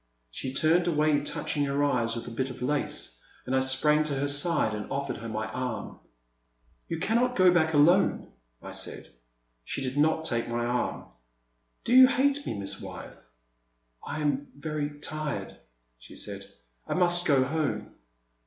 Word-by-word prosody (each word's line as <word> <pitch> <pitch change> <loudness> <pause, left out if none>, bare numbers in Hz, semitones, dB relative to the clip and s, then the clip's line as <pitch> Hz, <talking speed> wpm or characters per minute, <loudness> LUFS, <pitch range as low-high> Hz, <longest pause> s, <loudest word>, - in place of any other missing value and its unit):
She 130 - -4
turned 160 +6 +3
away, 155 -2 +3
touch 145 - -2
ing 145 -1 +1
her 140 +1 0
eyes 120 -5 +1
with 115 0 -6
a - - -6
bit 130 +3 -2
of 125 - -7
lace, 135 - -2 0.2
and 130 - -1
I - - +4
sprang 135 +4 +3
to 145 -2 -1
her 140 +1 0
side 145 -5 +1
and 105 0 -6
offered 140 0 -2
her 115 0 -7
my 110 0 -2
arm. 125 +2 -4 0.9
You 165 - -3
cannot 235 +8 +1
go 185 -1 +6
back 160 -2 +2
alone," 170 +7 +4 0.3
I - - -7
said. - - -4 0.5
She 135 - -4
did 130 +1 -3
not 160 +2 +2
take 120 -5 -1
my 120 0 -1
arm. 120 +1 -2 0.8
Do 235 - 0
you 260 0 +10
hate 280 +2 +1
me. - - -3
Miss 100 -1 -3
Wyeth? - - -10 0.4
" - - -46 0.3
I 155 - -4
am 145 -1 0
very 145 0 -4
tired,'* 150 - -4 0.4
she - - -13
said, - - -6 0.2
*' - - -42
I - - -1
must 175 -1 +2
go 140 -4 +4
home.' 150 +2 -2
145 Hz, 175 wpm, -28 LUFS, 125-160 Hz, 0.9 s, you